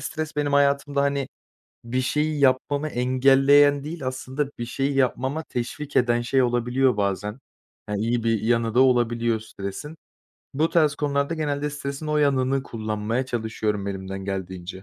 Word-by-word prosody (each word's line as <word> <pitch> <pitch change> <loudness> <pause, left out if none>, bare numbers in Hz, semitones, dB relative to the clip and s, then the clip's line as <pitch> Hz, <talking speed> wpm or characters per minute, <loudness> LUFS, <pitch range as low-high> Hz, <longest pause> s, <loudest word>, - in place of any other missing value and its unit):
stres 155 +1 -5
benim 145 -1 0
hayatımda, 140 0 +2
hani, 140 -1 0 0.6
bir 125 +2 -1
şeyi 150 +3 0
yapmamı 140 +3 +2
engelleyen 135 +2 +4
değil, 155 -3 -6
aslında 130 +2 -3
bir 120 - -3
şeyi 135 +3 -1
yapmama 135 +3 0
teşvik 140 +3 -5
eden 120 -1 +3
şey 130 +2 +2
olabiliyor 125 0 +1
bazen. 100 +2 -2 0.5
Ya, 105 - -2
iyi 115 +2 -1
bir 115 -2 +1
yanı 115 0 +1
da 125 - +5
olabiliyor 120 -3 +2
stresin. 110 +9 -7 0.6
Bu 155 +4 +1
tarz 155 -4 +3
konularda 140 +2 -1
genelde 150 -1 -2
stresin 140 +1 -5
o 150 - 0
yanını 135 -2 +2
kullanmaya 110 +2 -3
çalışıyorum 110 -4 -2
elimden 95 0 -5
geldiğince. 95 -1 -5
130 Hz, 145 wpm, -24 LUFS, 115-145 Hz, 0.6 s, da